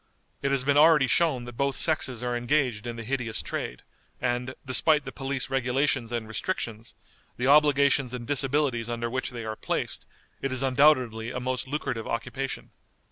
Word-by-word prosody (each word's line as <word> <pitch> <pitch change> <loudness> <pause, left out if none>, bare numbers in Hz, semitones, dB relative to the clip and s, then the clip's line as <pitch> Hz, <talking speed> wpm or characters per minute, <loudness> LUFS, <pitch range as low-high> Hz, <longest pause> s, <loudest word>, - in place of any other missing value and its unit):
It 140 - 0
has 135 -2 +3
been 140 +1 +2
already 155 -3 +6
shown 130 -2 +2
that 120 -1 -9
both 140 -1 0
sexes 130 -7 +1
are 120 0 -1
engaged 120 -3 0
in 120 - -4
the 115 - -6
hideous 120 -2 -3
trade, - - -5 0.4
and, 125 +1 -2
despite 150 +3 +3
the 135 - -7
police 135 -1 -3
regulations 130 -1 +1
and 115 -2 -3
restrictions, 115 - -4 0.4
the 125 - -1
obligations 140 -2 +4
and 125 -1 -5
disabilities 135 -3 0
under 120 0 -3
which 130 +1 -2
they 120 -3 -7
are 110 0 -4
placed, - - -3 0.3
it 135 - -2
is 130 0 +1
undoubtedly 130 -4 +3
a 125 - -4
most 130 +1 -3
lucrative 130 -5 -3
occupation. 135 +3 -4
130 Hz, 170 wpm, -27 LUFS, 120-140 Hz, 0.4 s, already